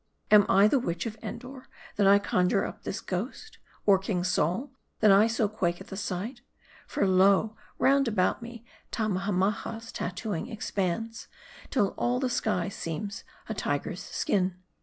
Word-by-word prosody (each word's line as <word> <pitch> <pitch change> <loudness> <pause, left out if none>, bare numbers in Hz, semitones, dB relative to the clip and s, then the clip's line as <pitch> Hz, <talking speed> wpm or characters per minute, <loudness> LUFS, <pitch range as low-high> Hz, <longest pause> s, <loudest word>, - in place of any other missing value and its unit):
Am 210 -1 +7
I 195 +2 +6
the 270 +5 +3
witch 170 -6 -3
of 220 -2 -4
Endor, 255 +2 -8 0.3
that 200 -2 +3
I 200 +1 +8
conjure 195 -1 +1
up - - -7
this 210 - -4
ghost? 235 - -5 0.3
Or, 195 -2 +6
King 190 -2 -2
Saul, 180 - 0 0.3
that 215 -2 +6
I 200 +3 +6
so 225 -1 +1
quake 175 -5 -1
at 190 - -11
the - - -6
sight? 210 +6 -4 0.5
For, 200 - 0
lo! 195 +3 +4 0.2
roundabout 240 -10 +2
me 235 0 -9 0.3
Tammahammaha's 205 +2 -1
tattooing 200 +4 -4
ex 220 - -5
pands, 215 +4 -2 0.4
till 205 -7 +2
all 245 +1 +1
the 255 -2 -1
sky 210 -7 0
seems 195 +2 -5 0.2
a 220 - -3
tiger's 145 -1 -2
skin. 185 -2 0
205 Hz, 155 wpm, -28 LUFS, 185-230 Hz, 0.5 s, I